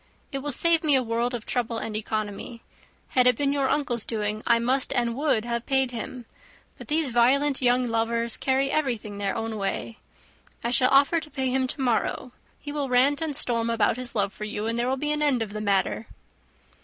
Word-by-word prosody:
It 275 - -3
will 290 +2 -3
save 335 +1 +3
me 295 -3 +4
a 260 - +3
world 235 +1 -1
of 230 - -7
trouble 235 -2 -1
and 220 -1 -4
economy. 215 +1 -4 0.5
Had 250 -1 +3
it 250 - +5
been 280 +2 0
your 275 -2 +1
uncle's 245 -7 0
doing, 215 -1 -2
I 235 - +5
must 255 +3 +1
and 235 -1 0
would 270 -5 +1
have 235 0 -3
paid 265 -2 +2
him; 240 +1 -6 0.5
but - - -10
these 305 -3 0
violent 265 +4 +3
young 250 0 +3
lovers 230 0 0
carry 270 +1 0
everything 230 -9 -2
their 200 -1 -1
own 225 -1 -3
way. 205 +3 -3 0.6
I 235 - -1
shall 255 +1 +4
offer 280 +5 +4
to 315 -1 -8
pay 265 -3 -2
him 260 0 +1
to 270 - -4
morrow, 250 0 0 0.3
he 290 - -7
will 285 -2 -2
rant 270 +4 +3
and 310 -3 -2
storm 235 -2 +1
about 225 -1 +1
his 250 -1 -6
love 200 -2 0
for 210 - -6
you, 210 0 -4
and 230 +1 -1
there 240 - 0
will 265 - 0
be 295 +2 -2
an 300 0 -1
end 275 -6 +2
of 205 -2 -8
the 215 - -4
matter." 200 +2 0
245 Hz, 215 wpm, -25 LUFS, 225-275 Hz, 0.6 s, it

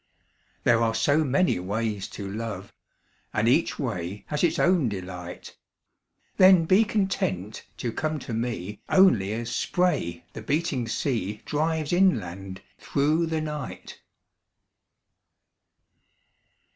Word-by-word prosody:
There 115 -1 +4
are 115 -1 +1
so 150 +5 +3
many 145 - +2
ways 105 +1 -2
to 100 - -7
love 100 -2 -6 0.6
And - - +2
each - - +2
way 90 +3 -4
has 150 +1 -1
its 165 -1 +2
own 170 -8 +3
delight 90 -3 -7 0.8
Then 185 -3 +7
be 190 +6 +5
content 180 - -2
to 120 +1 -3
come 155 +6 -2
to 125 -4 -7
me 110 -4 -3
Only 120 - +5
as 120 +1 -3
spray 140 - 0
the - - -7
beating 145 -6 -1
sea 110 -4 -2
Drives 155 +1 -1
inland 95 - 0 0.2
through 155 +4 +1
the 160 -1 -1
night. 150 -1 -6
120 Hz, 115 wpm, -26 LUFS, 100-160 Hz, 0.8 s, Then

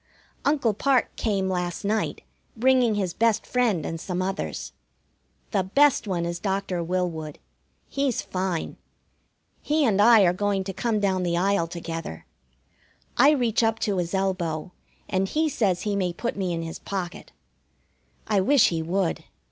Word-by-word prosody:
Uncle 280 -7 +2
Parke 260 +4 +1
came 195 -4 0
last 180 -1 -2
night, 215 +1 -1 0.4
bringing 250 -2 +3
his 190 -4 -1
best 225 -1 +1
friend 230 -11 +1
and 165 0 -4
some 180 -1 -3
others. 190 +1 -3 0.8
The 200 - +2
best 270 +6 +3
one 175 -3 -1
is 170 0 -3
Doctor 195 -2 -2
Willwood. 165 -4 -2 0.5
He's 275 -4 -1
fine. 185 -3 -3 0.8
He 300 0 +1
and 205 -4 +3
I 225 0 +7
are 175 -1 +4
going 200 0 0
to 195 0 -5
come 220 +2 0
down 190 -2 +1
the 170 -1 0
aisle 190 -1 +2
together. 165 - -6 0.9
I 275 +4 +6
reach 245 -7 +2
up 225 -1 +2
to 200 -3 0
his 175 +2 -2
elbow, 180 -4 -1 0.4
and 190 0 0
he 315 +8 +1
says 200 - 0
he 210 -1 -1
may 185 -3 0
put 235 +6 -3
me 190 -3 -2
in 165 -1 -2
his 165 0 -6
pocket. 185 -3 -5 0.9
I 205 -3 +2
wish 270 +5 +5
he 165 -2 -2
would. 175 +2 -1
195 Hz, 155 wpm, -25 LUFS, 175-225 Hz, 0.9 s, I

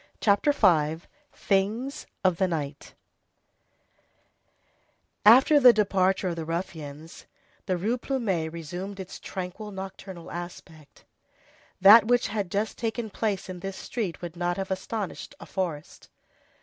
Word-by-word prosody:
CHAPTER 205 +7 +3
V—THINGS 200 - 0 0.2
OF 185 -3 +3
THE 190 - +2
NIGHT 150 -4 -5 2.3
After 260 +7 +7
the 250 -3 +9
departure 195 -3 +1
of 170 - -3
the 165 - -3
ruffians, 160 -2 -6 0.4
the 185 - +1
Rue 225 +8 -1
Plumet 195 - -1
resumed 175 +5 -6
its 190 -1 -8
tranquil, 190 +3 -6
nocturnal 190 -2 -8
aspect. 170 -3 -10 0.7
That 210 +4 +9
which 245 0 +2
had 205 -3 -2
just 205 +4 -2
taken 225 -1 -3
place 205 -5 -2
in 185 -1 -7
this 195 +1 -6
street 200 -8 -4
would 170 -1 -6
not 175 0 -1
have 195 0 -4
astonished 190 +1 -4
a - - -10
forest. 170 -6 -5
190 Hz, 125 wpm, -27 LUFS, 175-215 Hz, 2.3 s, the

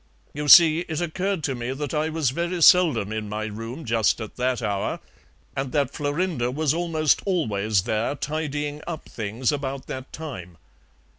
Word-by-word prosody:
You 150 0 -4
see 160 +1 +8
it 160 -3 -4
occurred 180 +1 -2
to 135 - 0
me 120 +1 -4
that 145 0 -5
I 155 +1 0
was 155 -5 0
very 170 +4 -2
seldom 150 - +5
in 110 -1 -4
my 105 +1 -3
room 115 +8 -7
just 115 -1 +2
at 110 -2 -7
that 125 0 0
hour, 100 -4 -2 0.6
and 135 -1 -3
that 140 -2 +1
Florinda 145 -3 -1
was 150 +2 0
almost 165 -3 +1
always 110 - 0
there 110 +7 -1
tidying 150 0 -3
up 165 -3 -6
things 115 +3 -2
about 140 -2 -4
that 130 0 -7
time. 105 - -8
140 Hz, 165 wpm, -24 LUFS, 115-160 Hz, 0.6 s, see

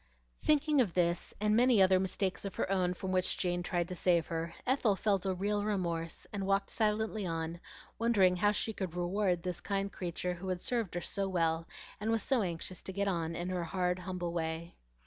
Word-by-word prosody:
Thinking 300 -1 +4
of 200 -9 -1
this, 175 -1 +1
and 210 0 +2
many 245 -1 +5
other 190 -1 +6
mistakes 190 0 -1
of 195 - -5
her - - -1
own 180 -2 +1
from 185 +1 -4
which 185 -1 +2
Jane 175 -1 0
tried 175 -1 -1
to - - -3
save 175 -2 +2
her, 165 0 -3
Ethel 250 -6 +3
felt 195 -1 +1
a 190 - 0
real 205 +2 0
remorse, 170 -6 -2
and 195 -2 -2
walked 195 0 +1
silently 220 -1 0
on, 165 0 -3 0.4
wondering 200 -6 +4
how 205 +3 +3
she 220 +1 -1
could 185 -5 -4
reward 180 0 0
this 180 -2 -3
kind 200 -1 -1
creature 180 0 -2
who 180 +2 -7
had 180 -1 -1
served 230 -8 -1
her 175 - -1
so 195 +1 -1
well 165 -2 +1 0.3
and 210 +2 -2
was 225 -1 +1
so 265 -4 +2
anxious 180 0 -2
to - - -5
get 200 +1 -1
on 165 -3 -1
in 175 +2 -3
her 180 -2 -2
hard, 180 +1 0
humble 180 -2 -4
way. 165 0 -3
185 Hz, 205 wpm, -32 LUFS, 175-205 Hz, 0.4 s, other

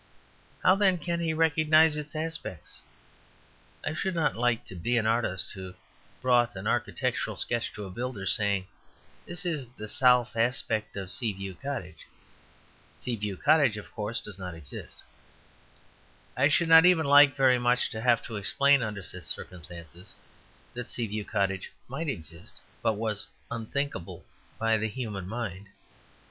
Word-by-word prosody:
How, 185 - +7
then, 195 -2 +4
can 170 +1 -2
he 165 -1 0
recognize 160 0 +4
its 150 0 -6
aspects? 155 - -5 1.0
I - - -1
should 190 +3 -2
not 165 - +1
like 120 0 +1
to 95 - -11
be 120 +8 0
an 110 - +1
artist 110 -6 0
who 95 -2 -8 0.5
brought 120 -3 +3
an 95 - -7
architectural - - -1
sketch 120 -1 -1
to 105 - -7
a 95 - -8
builder, 120 -1 -4
saying, 100 -1 +2 0.6
"This 175 +1 -3
is 150 -7 -2
the 110 - -6
south 125 0 +3
aspect 115 -3 -1
of 95 -2 -5
Sea 115 -6 0
View 95 0 -6
Cottage. 90 - -6 0.9
Sea 125 - -3
View 105 -3 -4
Cottage, 145 - +4
of 105 - -9
course, 110 0 -3
does 100 -2 -8
not 90 -2 -6
exist." 75 -4 -8 1.3
I - - +4
should 165 +3 +2
not 160 0 +9
even 180 -3 +5
like 145 0 +7
very 130 -3 +4
much 120 +1 +2
to 110 - -5
have 120 -1 +3
to 110 - -5
explain, 140 +7 +4
under 105 -4 -4
such 95 +1 -6
circumstances, 85 +1 -6 0.6
that 125 -1 -6
Sea 120 - -2
View 105 0 -4
Cottage 95 -2 -1 0.2
might 150 +6 -4
exist, 85 - -6 0.2
but 110 - +2
was 105 -1 -2 0.2
unthinkable 115 - -4 0.3
by 115 0 +2
the 110 - 0
human 105 -6 -5
mind. 100 -3 -5
115 Hz, 155 wpm, -28 LUFS, 100-140 Hz, 1.3 s, not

